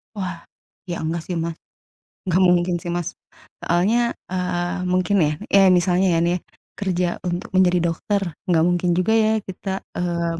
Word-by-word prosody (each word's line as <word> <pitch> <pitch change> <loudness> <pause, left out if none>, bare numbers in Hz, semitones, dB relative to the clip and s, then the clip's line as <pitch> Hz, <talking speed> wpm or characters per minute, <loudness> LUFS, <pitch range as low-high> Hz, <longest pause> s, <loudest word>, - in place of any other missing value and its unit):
Wah, 185 -3 -4 0.5
iya 175 - -3
enggak 165 +1 -2
sih 180 - -3
Mas, 165 0 -3 0.7
enggak 185 -1 +1
mungkin 175 0 +2
sih, 175 - -3
Mas. 175 -2 -2 0.5
Soalnya, 180 +7 +2 0.3
eee, 180 0 -1
mungkin 185 +2 +1
ya, 150 - +1 0.2
iya 195 - +6 0.2
misalnya 180 +2 +2
ya - - +3
nih, 175 +1 +1 0.4
kerja 180 -3 0 0.2
untuk 175 +1 -3
menjadi 180 -1 +4
dokter, 200 +4 -1 0.3
enggak 165 -3 +3
mungkin 175 0 +1
juga 185 +5 +2
ya 215 - +3 0.2
kita, 190 +1 -6 0.3
eee, 170 -1 -1
180 Hz, 155 wpm, -22 LUFS, 175-185 Hz, 0.7 s, iya